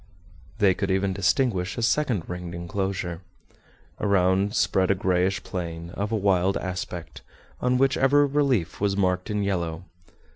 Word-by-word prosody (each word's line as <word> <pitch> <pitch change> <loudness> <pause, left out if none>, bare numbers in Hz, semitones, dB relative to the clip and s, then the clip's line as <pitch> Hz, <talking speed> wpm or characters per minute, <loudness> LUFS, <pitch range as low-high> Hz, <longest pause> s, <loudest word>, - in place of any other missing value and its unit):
They 100 -3 +4
could 100 +1 -3
even 95 0 +1
distinguish 100 0 +1
a 120 - -2
second 115 - +1
ringed 90 -1 -6
enclosure. 90 0 -3 0.8
Around 100 +1 +2
spread 95 -5 +2
a 100 - +4
grayish 95 +1 0
plain, 85 -2 -5
of 100 +3 -3
a - - +1
wild 95 -2 +2
aspect, 90 -2 -5 0.4
on 125 0 +2
which 135 +1 +2
every 145 +2 +4
relief 135 - 0
was 100 -1 +1
marked 90 -1 0
in 105 -1 -1
yellow. 85 -4 -2
95 Hz, 145 wpm, -25 LUFS, 90-105 Hz, 0.8 s, They